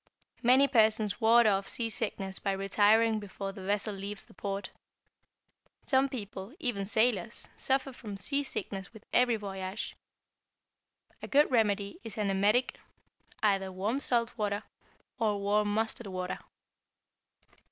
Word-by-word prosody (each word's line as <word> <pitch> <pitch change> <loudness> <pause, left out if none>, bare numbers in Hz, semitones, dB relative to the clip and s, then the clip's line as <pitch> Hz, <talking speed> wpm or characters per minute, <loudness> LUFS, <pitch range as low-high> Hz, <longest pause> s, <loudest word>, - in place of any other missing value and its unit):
Many 260 +3 +6
persons 220 -4 +2
ward 230 +1 +6
off 195 -2 +2
seasickness 210 -4 -1
by 195 - -1
retiring 210 +3 +3
before 195 -1 -6
the 195 -1 -10
vessel 205 +2 -1
leaves 200 +1 -6
the - - -19
port. 195 +1 -4 1.1
Some 270 0 +2
people, 210 -1 -6
even 240 - -1
sailors, 220 0 +1
suffer 270 0 0
from 210 -5 -8
seasickness 210 -4 -2
with 220 -2 -14
every 245 -1 +4
voyage. 195 -1 -5 1.3
A - - -6
good 285 0 +4
remedy 205 -4 +1
is 225 -2 -7
an 205 -2 0
emetic, 205 +6 +2 0.6
either 195 -2 +2
warm 205 +8 -1
salt 240 -4 0
water, 205 -1 -1 0.6
or 210 -3 +1
warm 205 +1 +1
mustard 220 +1 0
water. 185 -1 -4
210 Hz, 125 wpm, -30 LUFS, 195-235 Hz, 1.3 s, Many